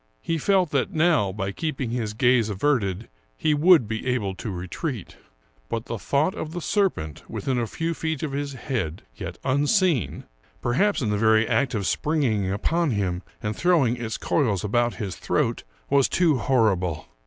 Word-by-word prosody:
He 165 Hz, -1 st, -1 dB
felt 185 Hz, -2 st, +2 dB
that 140 Hz, -2 st, 0 dB
now, 155 Hz, -, +3 dB
by 95 Hz, 0 st, -3 dB
keeping 135 Hz, 0 st, -3 dB
his 110 Hz, -3 st, -2 dB
gaze 120 Hz, -2 st, +3 dB
averted, 105 Hz, -3 st, 0 dB, 0.3 s
he 155 Hz, -, +2 dB
would 155 Hz, -, +5 dB
be 110 Hz, +3 st, -4 dB
able 115 Hz, -6 st, 0 dB
to 105 Hz, -, -6 dB
retreat. 95 Hz, -, -5 dB, 0.5 s
But 115 Hz, 0 st, -3 dB
the -, -, -5 dB
tlK)ught 145 Hz, -, +1 dB
of 160 Hz, 0 st, -6 dB
the 175 Hz, -, -3 dB
serpent 180 Hz, -, -1 dB
within 130 Hz, -2 st, -1 dB
a 115 Hz, -, -1 dB
few 165 Hz, +8 st, -2 dB
feet 160 Hz, -2 st, -3 dB
of 150 Hz, -, -2 dB
his 140 Hz, 0 st, -3 dB
head, 120 Hz, -, -3 dB
yet -, -, -6 dB
unseen 145 Hz, -, +1 dB, 0.2 s
— -, -, -34 dB
perhaps 165 Hz, +7 st, +2 dB
in 105 Hz, -, 0 dB
the 105 Hz, -, 0 dB
very 110 Hz, 0 st, +4 dB
act 120 Hz, +2 st, +1 dB
of 100 Hz, -3 st, -1 dB
springing 130 Hz, -, 0 dB
upon 165 Hz, -, 0 dB
him 95 Hz, -6 st, -1 dB, 0.2 s
and 105 Hz, 0 st, -2 dB
throw 175 Hz, -5 st, +3 dB
ing 120 Hz, 0 st, +1 dB
its 115 Hz, -2 st, -4 dB
coils 110 Hz, -, 0 dB
about 120 Hz, +3 st, +1 dB
his 100 Hz, -6 st, -5 dB
throat -, -, 0 dB
— -, -, -35 dB
was 140 Hz, -2 st, +4 dB
too 160 Hz, -7 st, +3 dB
horrible. 95 Hz, -, +1 dB
125 Hz, 180 wpm, -24 LUFS, 105-155 Hz, 0.5 s, would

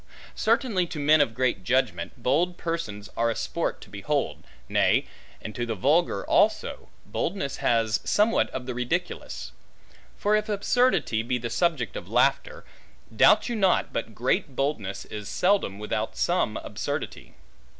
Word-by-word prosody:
Certainly 220 Hz, -5 st, +1 dB
to 155 Hz, -, -6 dB
men 150 Hz, +1 st, +5 dB
of 115 Hz, -6 st, +1 dB
great 125 Hz, -6 st, 0 dB
judgment, 130 Hz, +5 st, 0 dB
bold 170 Hz, +7 st, +1 dB
persons 115 Hz, -12 st, -4 dB
are 115 Hz, 0 st, +1 dB
a 115 Hz, -, -1 dB
sport -, -, -2 dB
to -, -, -13 dB
behold; -, -, -2 dB, 0.2 s
nay, -, -, +3 dB, 0.4 s
and 110 Hz, -, -6 dB
to 120 Hz, -, -3 dB
the 115 Hz, -2 st, -2 dB
vulgar 140 Hz, -, +2 dB
also, -, -, +1 dB, 0.2 s
boldness 160 Hz, -6 st, -3 dB
has 115 Hz, -2 st, +1 dB
somewhat 215 Hz, +2 st, +2 dB
of 130 Hz, -1 st, -6 dB
the 125 Hz, -, -4 dB
ridiculous. 125 Hz, +9 st, -3 dB, 0.7 s
For 210 Hz, +1 st, +2 dB
if 215 Hz, +1 st, 0 dB
absurdity 210 Hz, -, +2 dB
be 125 Hz, +2 st, -1 dB
the 120 Hz, -1 st, -5 dB
subject 150 Hz, -, 0 dB
of -, -, -7 dB
laughter, -, -, +1 dB, 0.5 s
doubt 215 Hz, -, +5 dB
you 240 Hz, -, -2 dB
not 195 Hz, -4 st, +2 dB
but 115 Hz, -1 st, -4 dB
great 130 Hz, +2 st, 0 dB
boldness 110 Hz, -9 st, -2 dB
is 105 Hz, -1 st, -7 dB
seldom 180 Hz, -, +1 dB
without 105 Hz, +1 st, -3 dB
some 175 Hz, -11 st, +1 dB
absurdity. -, -, -5 dB
135 Hz, 150 wpm, -26 LUFS, 115-180 Hz, 0.7 s, men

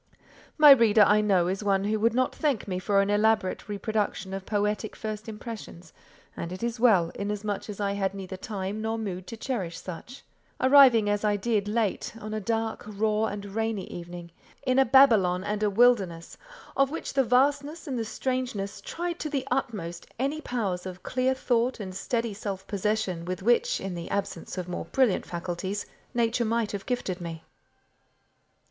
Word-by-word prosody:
My 300 Hz, -2 st, +9 dB
reader, 230 Hz, -5 st, +7 dB
I 210 Hz, +1 st, +5 dB
know, 190 Hz, -4 st, +3 dB
is 190 Hz, +3 st, -2 dB
one 195 Hz, -1 st, +2 dB
who 215 Hz, +1 st, 0 dB
would 230 Hz, +2 st, +2 dB
not 255 Hz, 0 st, +1 dB
thank 285 Hz, -10 st, -1 dB
me 185 Hz, -2 st, -2 dB
for 200 Hz, +2 st, +2 dB
an 200 Hz, -, -1 dB
elaborate 210 Hz, -2 st, +1 dB
reproduction 205 Hz, -2 st, -2 dB
of 195 Hz, 0 st, -6 dB
poetic 210 Hz, 0 st, -1 dB
first 215 Hz, 0 st, -5 dB
impressions; 210 Hz, -6 st, -9 dB, 0.4 s
and 170 Hz, -, -5 dB
it 185 Hz, +4 st, -6 dB
is 235 Hz, 0 st, -2 dB
well, 195 Hz, -9 st, +4 dB
inasmuch 205 Hz, 0 st, -3 dB
as 210 Hz, -, -6 dB
I 200 Hz, -1 st, 0 dB
had 200 Hz, -1 st, -1 dB
neither 190 Hz, -1 st, -6 dB
time 200 Hz, +1 st, -4 dB
nor 220 Hz, +1 st, -1 dB
mood 190 Hz, -4 st, -5 dB
to 230 Hz, -, -7 dB
cherish 200 Hz, -10 st, -3 dB
such; 190 Hz, +9 st, -9 dB, 0.4 s
arriving 260 Hz, -5 st, +7 dB
as 205 Hz, 0 st, 0 dB
I 210 Hz, -1 st, +2 dB
did 205 Hz, 0 st, 0 dB
late, 215 Hz, 0 st, -1 dB
on 215 Hz, 0 st, -6 dB
a 215 Hz, -, -1 dB
dark, 225 Hz, +1 st, -2 dB
raw, 215 Hz, +1 st, 0 dB
and 205 Hz, -1 st, -4 dB
rainy 220 Hz, -3 st, -1 dB
evening, 175 Hz, 0 st, -8 dB, 0.3 s
in 255 Hz, 0 st, +3 dB
a 270 Hz, -, +6 dB
Babylon 225 Hz, -9 st, +5 dB
and 210 Hz, +1 st, -2 dB
a 210 Hz, -, +3 dB
wilderness, 200 Hz, -7 st, +2 dB, 0.4 s
of 275 Hz, -1 st, +3 dB
which 325 Hz, -, -5 dB
the 270 Hz, -1 st, +3 dB
vastness 285 Hz, +5 st, +1 dB
and 260 Hz, -4 st, -2 dB
the -, -, 0 dB
strangeness 225 Hz, -3 st, -3 dB
tried 345 Hz, 0 st, -4 dB
to 305 Hz, -, -3 dB
the 275 Hz, -2 st, -2 dB
utmost 175 Hz, -10 st, -3 dB
any 280 Hz, +5 st, -1 dB
powers 195 Hz, -9 st, -2 dB
of 185 Hz, 0 st, -9 dB
clear 255 Hz, +1 st, 0 dB
thought 245 Hz, -1 st, 0 dB
and 190 Hz, -3 st, -6 dB
steady 230 Hz, +3 st, -2 dB
self 195 Hz, -2 st, -5 dB
possession 200 Hz, -3 st, -1 dB
with 185 Hz, +1 st, -4 dB
which, 240 Hz, +2 st, +3 dB
in 195 Hz, -1 st, -4 dB
the 170 Hz, -1 st, -6 dB
absence 200 Hz, -1 st, -3 dB
of 180 Hz, -1 st, -3 dB
more 180 Hz, -, -4 dB
brilliant 260 Hz, -8 st, +1 dB
faculties, 180 Hz, +3 st, -4 dB, 0.3 s
Nature 235 Hz, 0 st, +1 dB
might 225 Hz, -1 st, 0 dB
have 200 Hz, -1 st, -6 dB
gifted 195 Hz, -8 st, -2 dB
me. 165 Hz, -1 st, -6 dB
210 Hz, 180 wpm, -27 LUFS, 190-235 Hz, 0.4 s, My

